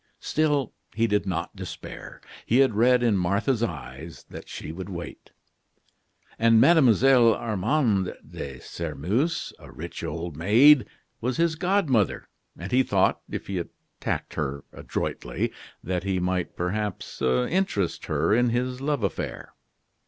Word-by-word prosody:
Still 145 Hz, -5 st, 0 dB, 0.2 s
he 115 Hz, +1 st, +2 dB
did 105 Hz, -2 st, 0 dB
not 85 Hz, -2 st, -3 dB
despair. -, -, -8 dB, 0.3 s
He 120 Hz, -, +3 dB
had 135 Hz, -3 st, +4 dB
read 120 Hz, +3 st, +4 dB
in 115 Hz, -4 st, +3 dB
Martha's 100 Hz, +7 st, +1 dB
eyes 75 Hz, -, -5 dB
that -, -, -9 dB
she -, -, -6 dB
would 95 Hz, +4 st, -7 dB
wait. 85 Hz, -2 st, -8 dB, 1.1 s
And 115 Hz, 0 st, +5 dB
Mlle. 130 Hz, -5 st, +6 dB
Armande 110 Hz, -2 st, 0 dB
de 65 Hz, -2 st, -7 dB
Sairmeuse, 85 Hz, -, -2 dB
a -, -, -13 dB
rich -, -, -7 dB
old 85 Hz, -2 st, -4 dB
maid, 120 Hz, -, +6 dB, 0.3 s
was 125 Hz, +2 st, -1 dB
his 170 Hz, -1 st, +2 dB
god 185 Hz, +2 st, +1 dB
mother; 110 Hz, -8 st, +1 dB, 0.3 s
and 95 Hz, +3 st, -7 dB
he 130 Hz, -, +5 dB
thought, 100 Hz, -7 st, +2 dB
if -, -, -5 dB
he 95 Hz, -2 st, -3 dB
attacked 85 Hz, -, -5 dB
her 70 Hz, -2 st, -3 dB
adroitly, -, -, -3 dB, 0.3 s
that 90 Hz, 0 st, -2 dB
he 95 Hz, -1 st, 0 dB
might, 90 Hz, 0 st, -1 dB
perhaps, 100 Hz, +2 st, -3 dB
interest 90 Hz, -, 0 dB
her -, -, +1 dB
in 120 Hz, +2 st, +3 dB
his 125 Hz, +2 st, -1 dB
love 145 Hz, -4 st, -1 dB
affair. 95 Hz, -, -4 dB
105 Hz, 135 wpm, -26 LUFS, 90-125 Hz, 1.1 s, Mlle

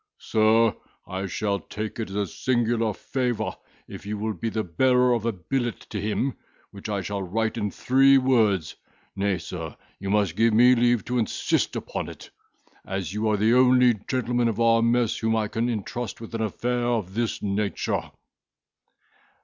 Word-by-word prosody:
Sir, 110 Hz, +1 st, +3 dB, 0.3 s
I 95 Hz, +1 st, -4 dB
shall 100 Hz, +2 st, -1 dB
take 105 Hz, +6 st, -6 dB
it 110 Hz, -, -3 dB
as 95 Hz, -, -7 dB
a 105 Hz, 0 st, 0 dB
singular 120 Hz, 0 st, 0 dB
favour 120 Hz, -1 st, -2 dB, 0.3 s
if -, -, -9 dB
you 105 Hz, +2 st, -4 dB
will 110 Hz, +1 st, -2 dB
be 115 Hz, -, -3 dB
the 110 Hz, 0 st, -2 dB
bearer 125 Hz, +7 st, +3 dB
of 115 Hz, -1 st, -1 dB
a -, -, +2 dB
billet 120 Hz, +6 st, -3 dB
to 105 Hz, -, -3 dB
him, 110 Hz, +6 st, -1 dB, 0.4 s
which 100 Hz, +1 st, -8 dB
I 100 Hz, -2 st, -1 dB
shall 100 Hz, 0 st, -3 dB
write 110 Hz, +5 st, -1 dB
in 105 Hz, -, -1 dB
three 135 Hz, +5 st, +4 dB
words; 110 Hz, -, +2 dB, 0.4 s
nay, 100 Hz, -1 st, 0 dB
sir, 80 Hz, -2 st, -7 dB, 0.2 s
you 100 Hz, -, -5 dB
must 100 Hz, -4 st, +1 dB
give 115 Hz, 0 st, +3 dB
me 125 Hz, +3 st, +7 dB
leave 120 Hz, -1 st, +2 dB
to 125 Hz, +1 st, -1 dB
insist 110 Hz, -, 0 dB
upon -, -, -4 dB
it, -, -, -12 dB, 0.5 s
as 95 Hz, -2 st, -4 dB
you 110 Hz, +1 st, 0 dB
are 105 Hz, -, +2 dB
the 110 Hz, +3 st, +3 dB
only 125 Hz, -1 st, +5 dB
gentleman 120 Hz, -2 st, 0 dB
of 115 Hz, -1 st, -2 dB
our 115 Hz, 0 st, +4 dB
mess 115 Hz, -1 st, +2 dB
whom 110 Hz, 0 st, +1 dB
I 110 Hz, -1 st, 0 dB
can 115 Hz, +3 st, -1 dB
intrust 120 Hz, +1 st, -4 dB
with 115 Hz, 0 st, -10 dB
an 115 Hz, -, -2 dB
affair 120 Hz, +3 st, -1 dB
of 115 Hz, -6 st, -1 dB
this 115 Hz, +1 st, -2 dB
nature." 100 Hz, 0 st, -1 dB
110 Hz, 175 wpm, -25 LUFS, 100-120 Hz, 0.5 s, me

